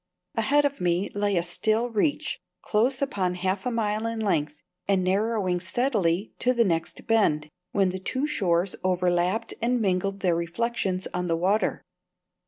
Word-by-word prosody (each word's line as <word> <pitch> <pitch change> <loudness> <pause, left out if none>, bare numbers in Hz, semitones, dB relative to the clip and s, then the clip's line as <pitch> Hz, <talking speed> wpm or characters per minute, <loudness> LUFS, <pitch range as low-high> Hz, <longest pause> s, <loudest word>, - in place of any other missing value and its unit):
Ahead 285 +6 +2
of 280 -7 -2
me 180 +2 +1
lay 205 -2 +1
a 170 - +2
still 220 +7 0
reach, 230 +7 0 0.2
close 255 +6 +1
upon 190 -9 -1
half 190 +3 -1
a - - 0
mile 220 -1 0
in 230 0 -3
length, 150 -8 0 0.3
and 195 -2 +2
narrowing 195 -1 +1
steadily 195 -2 0
to 250 0 +2
the 235 -1 +4
next 165 -3 -2
bend, 155 -10 +2 0.2
when 195 -2 +2
the 185 +1 -4
two 260 +9 -2
shores 190 - +1
overlapped 180 +3 +1
and 245 +2 +1
mingled 195 -1 0
their 180 -3 +2
reflections 185 +2 -1
on 180 0 -1
the 165 -1 +1
water. 195 +5 +1
195 Hz, 160 wpm, -26 LUFS, 180-230 Hz, 0.3 s, the